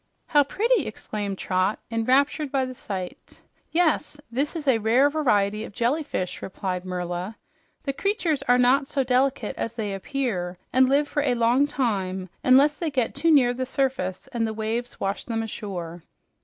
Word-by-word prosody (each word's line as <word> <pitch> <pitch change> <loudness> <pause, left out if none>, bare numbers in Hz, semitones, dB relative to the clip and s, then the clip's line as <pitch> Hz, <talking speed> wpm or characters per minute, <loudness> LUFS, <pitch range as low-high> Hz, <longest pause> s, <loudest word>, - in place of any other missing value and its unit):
"How 290 -1 +4
pretty!" 455 - +1
exclaimed 205 -2 -4
Trot, 185 +3 0
enraptured 270 +5 +2
by 270 -2 +1
the 255 - -6
sight. 190 -7 -7 0.3
"Yes, 320 -3 +1
this 280 +7 -1
is 305 -3 -5
a 245 -4 +4
rare 245 +7 +4
variety 210 -8 +1
of - - -9
jellyfish," 240 - -1
replied 185 -1 -4
Merla. 180 +3 -4 0.5
"The 275 - -2
creatures 355 - 0
are 245 0 +5
not 260 +3 +4
so 275 -1 0
delicate 255 -2 +1
as 230 0 -3
they 210 -4 -3
appear, 195 -5 -2 0.2
and 260 +1 +5
live 285 +2 +3
for 295 - -1
a 265 -4 +1
long 240 +4 +3
time 190 -9 -2
unless 280 +4 +5
they 335 - -1
get 255 -5 0
too 315 +4 +1
near 260 -6 +5
the 255 +1 -3
surface 260 -10 -1
and 230 -3 0
the 220 - -4
waves 225 +3 -3
wash 195 +1 -2
them 225 -2 -2
ashore." 175 -6 -6
245 Hz, 170 wpm, -25 LUFS, 205-280 Hz, 0.5 s, are